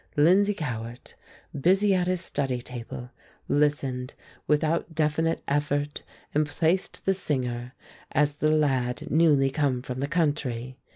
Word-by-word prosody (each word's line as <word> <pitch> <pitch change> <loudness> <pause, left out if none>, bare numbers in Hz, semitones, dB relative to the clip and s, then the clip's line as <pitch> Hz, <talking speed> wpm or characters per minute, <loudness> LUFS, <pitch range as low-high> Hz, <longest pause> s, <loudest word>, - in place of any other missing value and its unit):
Lindsay 195 +7 +5
Cowart, 120 -6 -6 0.4
busy 190 +8 +3
at 180 -1 +1
his 185 -1 0
study 135 -7 -1
table, 125 0 -8 0.4
listened 140 -4 0 0.3
without 160 +2 +1
definite 160 +1 +1
effort 145 0 -1 0.3
and 150 0 +2
placed 165 +5 0
the 195 - +3
singer 125 -8 -3 0.4
as 145 +1 +1
the 155 +1 +2
lad 135 -5 0
newly 145 -4 +4
come 135 -4 0
from 130 -1 -5
the 140 - -1
country. 140 -7 -1
145 Hz, 125 wpm, -26 LUFS, 130-160 Hz, 0.4 s, Lindsay